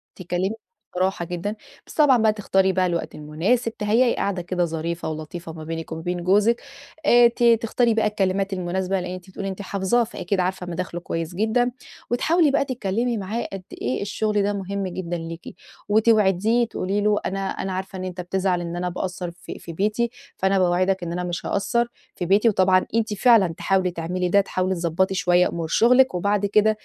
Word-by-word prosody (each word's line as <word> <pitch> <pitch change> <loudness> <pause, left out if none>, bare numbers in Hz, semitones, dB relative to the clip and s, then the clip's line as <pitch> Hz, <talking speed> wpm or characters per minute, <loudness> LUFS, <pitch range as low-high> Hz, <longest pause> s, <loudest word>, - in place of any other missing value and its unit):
تتكلمي 180 +2 -2 0.5
بصراحة 185 -1 0
جدًا، 180 +4 -4 0.3
بس - - -11
طبعًا 290 -5 +5
بقى 220 -2 +3
تختاري 190 -2 +2
بقى 185 0 +2
الوقت 170 -1 -2
المناسب، 185 +11 -1
تهيّئي 225 +4 +2
قاعدة 195 -2 -1
كده 175 0 -1
ظريفة 165 +1 -3
ولطيفة 160 +2 -6
ما 160 -1 -8
بينِك 165 +1 -5
وما 160 0 -4
بين 175 +1 -3
جوزِك. 210 +5 +3 0.4
آآ 240 -3 +7
ت 235 +1 -3
تختاري 230 0 +3
بقى 220 -1 +2
الكلمات 195 -1 0
المناسبة، 185 +1 -1
لإن 180 0 -5
أنتِ 185 0 -9
بتقولي 195 +1 -5
أنتِ 190 +1 -6
حافظاه، 200 +4 +1
فأكيد 195 -3 -3
عارفة 185 0 -1
مداخله 175 0 -4
كويس 165 0 -4
جدًا. 225 +4 +1 0.4
وتحاولي 315 +5 +3
بقى 275 - +2
تتكلّمي 235 -1 -1
معاه 210 +4 -3
قد 195 -1 -6 0.2
إيه 125 +2 -1
الشغل 210 0 0
ده 205 +1 0
مهم 195 0 -3
جدًا 175 -1 -4
ليكِ. 165 0 -8 0.3
وتوعديه 220 +1 +3
تقولي 200 -1 -2
له 210 0 +2
أنا 195 - -2
أنا 190 - -4
عارفة 190 0 -5
إن - - -4
أنت 185 -1 -5
بتزعل 185 0 0
إن 170 0 -5
أنا 180 +1 -2
باقصّر 180 0 -4
في 170 0 -10
في 165 - -9
بيتي، 215 +6 0 0.3
فأنا 190 0 +2
باوعدك 185 +1 +2
إن 170 - -4
أنا 180 +1 -2
مش 175 -1 -4
هاقصّر 235 +4 0 0.3
في 175 - -3
بيتي، 205 +6 +4
وطبعًا 185 -2 +3
أنتِ 225 -1 +1
فعلًا 215 -2 +5
تحاولي 190 -1 +1
تعملي 180 +2 -2
ده، 200 +3 +5
تحاولي 185 -1 -1
تضبّطي 175 +3 0
شوية 180 -1 +3
أمور 165 -1 -4
شُغلِك، 250 +5 +4
وبعد 205 +3 +1
كده 210 +2 +4
190 Hz, 185 wpm, -23 LUFS, 175-210 Hz, 0.5 s, آآ